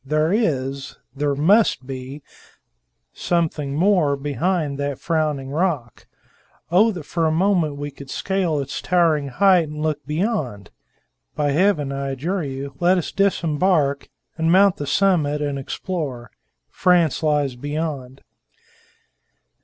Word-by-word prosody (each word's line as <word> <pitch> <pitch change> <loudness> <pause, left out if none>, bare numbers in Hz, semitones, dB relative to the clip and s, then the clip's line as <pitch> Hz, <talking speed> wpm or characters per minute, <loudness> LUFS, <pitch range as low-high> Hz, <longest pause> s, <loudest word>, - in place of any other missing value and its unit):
There 155 +5 +1
is 140 - -1 0.2
there 145 0 0
must 180 - +3
be 135 +2 -7 0.9
something 155 -5 -1
more 170 -4 +3
behind 145 +2 -1
that 140 -1 -2
frowning 150 -5 -1
rock. 150 - -2 0.6
Oh, 210 +6 +5
that 175 -4 -7
for 165 +2 -1
a - - +1
moment 170 -3 +1
we 145 0 -5
could 140 -1 -12
scale 190 -5 -1
its 140 -1 -4
towering 165 -5 +2
height 180 +2 +3
and 150 0 -7
look 150 -2 -1
beyond! 150 - -2 0.6
By 145 -1 0
Heaven, 155 -3 +2
I 140 0 -3
adjure 170 +7 -2
you, 140 0 -5
let 180 +2 +3
us 175 - -3
disembark, 165 -6 +1 0.3
and 165 +1 +2
mount 195 +1 +5
the 145 - -5
summit 155 -4 +2
and 145 -2 -2
explore! 135 - -5 0.4
France 175 -5 +2
lies 145 -4 +1
beyond." 145 -1 -5
150 Hz, 130 wpm, -21 LUFS, 140-175 Hz, 0.9 s, Oh